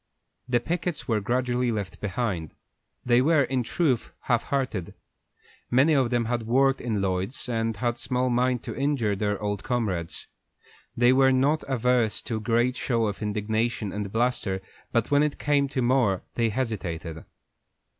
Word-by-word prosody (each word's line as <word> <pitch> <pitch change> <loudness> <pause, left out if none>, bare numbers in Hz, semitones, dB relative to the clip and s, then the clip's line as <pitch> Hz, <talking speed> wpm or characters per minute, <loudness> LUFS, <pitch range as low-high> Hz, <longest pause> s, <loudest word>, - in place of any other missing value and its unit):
The 120 -1 +3
pickets 175 +4 -3
were 110 -4 +1
gradually 125 +2 0
left 105 -4 -4
behind; 100 -7 -2 0.5
they 120 0 +4
were, 150 +1 +4
in 130 0 0
truth, 130 0 0
half 120 -2 +1
hearted. 130 -10 -2 0.7
Many 135 +6 +4
of 135 -4 +3
them 120 -1 +1
had 120 -1 -2
worked 135 +3 +3
in 110 -5 -1
Lloyd's, 95 +7 -2
and 115 -2 -1
had 120 +1 -1
small 125 0 0
mind 125 0 +1
to - - -6
injure 135 -7 0
their 105 0 -1
old 105 -1 -3
comrades. 100 -10 -2 0.7
They 120 +1 +5
were 130 0 +5
not 140 +4 +2
averse 125 -3 +1
to 115 - -2
a - - -3
great 120 +3 +1
show 115 -3 0
of 105 -1 -3
indignation 110 +1 -1
and 105 -1 -4
bluster, 115 -5 0 0.3
but 115 0 0
when 145 0 +5
it 150 -1 0
came 145 -1 +2
to 130 -2 -2
more 120 -7 +2
they 115 -1 +1
hesitated. 90 -9 -3
120 Hz, 160 wpm, -26 LUFS, 105-130 Hz, 0.7 s, They